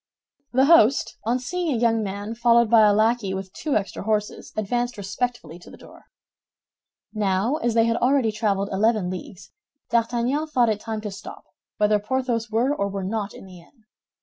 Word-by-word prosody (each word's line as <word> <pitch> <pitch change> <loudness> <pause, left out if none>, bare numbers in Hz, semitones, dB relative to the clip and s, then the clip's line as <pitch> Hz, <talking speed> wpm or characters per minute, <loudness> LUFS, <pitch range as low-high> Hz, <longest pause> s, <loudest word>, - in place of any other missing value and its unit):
The 260 +2 +3
host, 275 -5 +4
on 235 +3 +1
seeing 335 +6 -3
a 250 - 0
young 225 -1 +2
man 205 +2 -5
followed 235 -1 +3
by 220 -2 +7
a - - +5
lackey 215 -1 +1
with 190 0 -7
two 300 -3 -2
extra 200 -2 -2
horses, 210 0 -2
advanced 240 +3 -2
respectfully 205 -3 -4
to - - -15
the - - -13
door. - - -16 1.1
Now, 210 +5 0
as 235 -6 -1
they 225 0 +4
had 230 0 +1
already 255 -3 +2
traveled 200 -2 -1
eleven 205 -2 +1
leagues, 185 0 -9 0.4
D'Artagnan 240 +6 0
thought 245 -6 +2
it 215 -1 -1
time 220 0 -5
to 210 -1 -5
stop, 195 - -10 0.3
whether 210 0 +3
Porthos 235 0 -2
were 235 +6 +1
or 200 - -1
were 195 -1 -4
not 210 +1 -3
in - - -12
the 185 -2 -13
inn. 215 +7 -23
225 Hz, 180 wpm, -23 LUFS, 200-240 Hz, 1.1 s, by